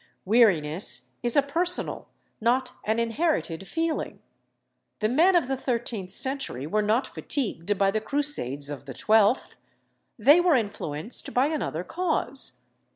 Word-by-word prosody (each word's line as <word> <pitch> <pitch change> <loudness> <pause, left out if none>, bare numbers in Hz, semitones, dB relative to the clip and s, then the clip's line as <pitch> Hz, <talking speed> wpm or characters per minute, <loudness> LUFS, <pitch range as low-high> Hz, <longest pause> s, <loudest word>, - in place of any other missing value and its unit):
Weariness 185 -6 +2
is 240 +2 +2
a 285 - +5
personal, 340 +6 0 0.3
not 250 +3 +1
an 220 +1 0
inherited 230 - -1
feeling. 325 -1 -2 0.8
The 215 - 0
men 330 +11 +4
of 340 -7 +3
the 270 - -1
thirteenth 235 -7 -3
century 260 - -3
were 210 +7 0
not 215 +5 +1
fatigued 205 - -3
by 195 0 +2
the 215 +1 -1
Crusades 215 - -1
of 145 - -8
the - - -9
twelfth. 220 - +2 0.6
They 285 +9 +6
were 350 -4 +3
influenced 205 - -1
by 260 +4 +3
another 280 - -3
cause. 315 - -2
235 Hz, 135 wpm, -26 LUFS, 200-285 Hz, 0.8 s, They